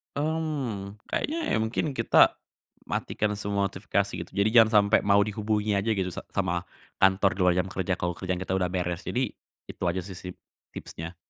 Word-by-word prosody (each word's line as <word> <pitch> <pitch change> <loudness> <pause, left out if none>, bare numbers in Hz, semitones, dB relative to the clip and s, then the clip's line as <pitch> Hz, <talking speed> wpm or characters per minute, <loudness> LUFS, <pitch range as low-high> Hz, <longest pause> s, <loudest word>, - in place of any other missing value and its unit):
Mmm, 140 -10 -2 0.2
kayaknya 320 +3 -1
ya - - +3
mungkin 110 +6 -1
kita, 115 -3 +4 0.5
matikan 105 -1 -1
semua 100 -1 0
notifikasi 100 +1 -1
gitu. - - -19
Jadi 100 +2 +2
jangan 110 -1 +7 0.2
sampai 110 - +5
mau 100 0 +5
dihubungi 105 0 -1
aja 100 +3 +1
gitu 95 -3 0
sa - - -5
sama 90 -3 0 0.4
kantor 95 +1 +5
di - - -10
luar 90 -1 +5
jam 90 - 0
kerja 95 0 -2
kalau 85 0 -1
kerjaan 90 -1 -3
kita 95 +1 -2
udah 90 -2 +1
beres. 90 0 -2
Jadi, 125 -3 -1 0.3
itu - - -8
aja 95 +2 -1
sih 95 - -8
sip 90 +1 -8 0.3
tipsnya. 80 +2 -7
100 Hz, 180 wpm, -27 LUFS, 95-110 Hz, 0.5 s, jangan